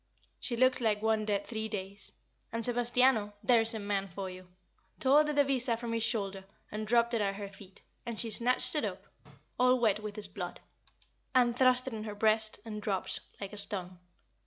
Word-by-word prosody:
She 235 - -1
looked 255 +1 +3
like 215 -2 +1
one 220 -1 +2
dead 205 -1 0
three 220 -1 -3
days; 200 -1 -5 0.4
and 230 0 +1
Sebastiano 245 -3 +3
there 240 -3 +5
is 225 +1 +4
a - - -3
man 200 -1 -1
for 190 +1 -6
you! 185 0 -11 0.5
tore 280 +3 +5
the 300 - -1
devisa 270 -5 +2
from 235 0 -4
his 230 - 0
shoulder 200 -4 -1 0.3
and 215 0 -4
dropped 235 +1 +3
it 230 - +1
at 195 -1 0
her 200 0 -5
feet; 195 -1 -15 0.2
and 235 -2 -5
she 230 -2 +1
snatched 250 +3 +1
it 300 - 0
up - - -4 0.5
all 250 0 +5
wet 215 -4 +2
with 210 -1 -6
his 210 -2 -3
blood 180 -2 -6 0.8
and 240 -2 +4
thrust 255 0 +4
it 265 - -5
in 215 -1 -5
her 210 -1 -5
breast, 215 +1 +3
and 210 -2 -6
dropped 195 -2 -2 0.2
like 200 0 -6
a - - -7
stone. 185 -3 -4
220 Hz, 200 wpm, -31 LUFS, 205-240 Hz, 0.8 s, there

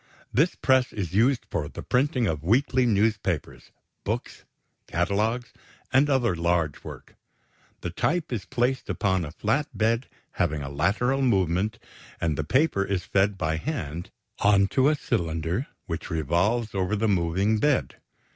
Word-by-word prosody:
This 155 +7 +3
press 130 -2 +2
is 95 -5 -4
used 120 +5 +3
for 75 -3 -2
the - - -8
printing 130 -1 +1
of 80 -7 -1
weekly 125 - +2
newspapers, 105 -6 0 0.3
books, - - -4 0.4
catalogues, 105 +7 -1 0.4
and 140 +3 +4
other 120 -8 +2
large 85 -3 0
work. - - -10 0.7
The 85 - -4
type 160 - -1
is 105 -5 -2
placed 125 +4 -1
upon 95 -3 +1
a 75 - -5
flat 115 - 0
bed 115 +3 +1 0.2
having 75 -5 -1
a 70 - -5
lateral 110 - +1
movement, 100 -2 +1 0.4
and 80 -3 0
the 75 - -2
paper 130 - +2
is 95 -2 -2
fed 100 0 +1
by 80 -2 -1
hand 85 - -4 0.3
onto 100 +7 +4
a 155 - +2
cylinder 85 - -2 0.2
which 85 0 -5
revolves 90 - 0
over 95 +1 0
the 110 +2 +1
moving 95 +3 +1
bed. 145 +2 +1
100 Hz, 145 wpm, -26 LUFS, 85-125 Hz, 0.7 s, and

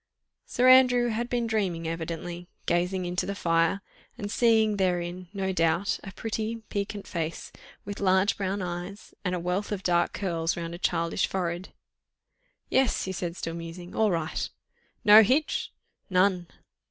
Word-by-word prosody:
Sir 250 +1 +2
Andrew 250 -2 +6
had 235 +2 -2
been 240 -1 0
dreaming 190 -7 -1
evidently, 165 +1 -5 0.2
gazing 180 +2 0
into 175 +1 -2
the 200 - -3
fire, 165 +1 +1 0.4
and 205 -3 -5
seeing 220 -3 +3
therein, 180 -1 -1
no 195 -2 -2
doubt, 170 +2 +1
a 195 - -7
pretty, 225 +2 -4
piquant 200 0 -3
face, 165 -2 -4 0.3
with 205 0 -6
large 190 0 +3
brown 195 0 -2
eyes 180 +3 -6
and 180 -1 0
a - - -2
wealth 180 +5 -2
of 200 -2 -3
dark 175 -1 +2
curls 170 -4 -1
round 170 0 -4
a 170 - -7
childish 170 0 0
forehead. 175 -1 -3 1.0
"Yes!" 265 -2 +2
he 190 - -3
said, 175 -1 -4
still 165 - -4
musing, 170 +1 -8
"all 220 -1 +3
right!" 165 -4 -2 0.6
"No 210 +1 +10
hitch?" 265 +8 +1 0.4
"None." 185 -1 +2
185 Hz, 155 wpm, -27 LUFS, 175-210 Hz, 1.0 s, No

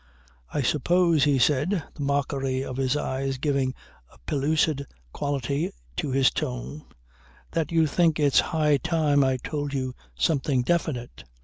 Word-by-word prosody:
"I 145 - -1
suppose," 165 +3 +3
he 145 -2 +3
said, 150 +7 +2
the 150 - -9
mockery 140 -2 -1
of 130 - -6
his 135 +1 +1
eyes 135 -1 -2
giving 135 -2 0 0.4
a - - -20
pellucid 145 0 +1 0.3
quality 140 +1 -1 0.3
to - - -1
his 135 0 +3
tone, 60 +4 -4 0.7
"that 165 -2 -1
you 165 -1 +4
think 160 +1 +2
it's 145 -2 +4
high 150 -3 +2
time 150 -2 +2
I 130 -1 +2
told 145 +2 -4
you 130 -1 -2 0.2
something 135 - +1
definite. 145 -6 -2
140 Hz, 140 wpm, -26 LUFS, 130-155 Hz, 0.7 s, you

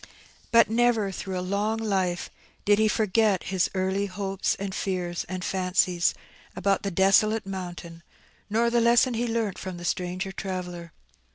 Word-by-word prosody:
But 230 0 +6
never, 230 -3 +2
through 190 0 -5
a - - -2
long 205 +4 0
life, 190 -5 -1 0.3
did 205 0 +4
he 220 - +4
forget 215 -2 +2
his 185 -2 +2
early 190 +2 0
hopes, 195 0 -2
and 195 -1 -5
fears, 180 -3 -2
and 185 -1 -4
fancies, 180 -2 +1 0.4
about 195 0 +1
the 200 - -2
desolate 195 +4 +3
mountain, 175 -3 -7 0.5
nor 230 +3 +2
the 240 0 +3
lesson 240 +2 +4
he 235 +1 -1
learnt 225 -4 -1
from 185 -2 -6
the 175 - -8
stranger 180 +2 -2
traveller. 180 -3 -5
195 Hz, 155 wpm, -26 LUFS, 185-215 Hz, 0.5 s, But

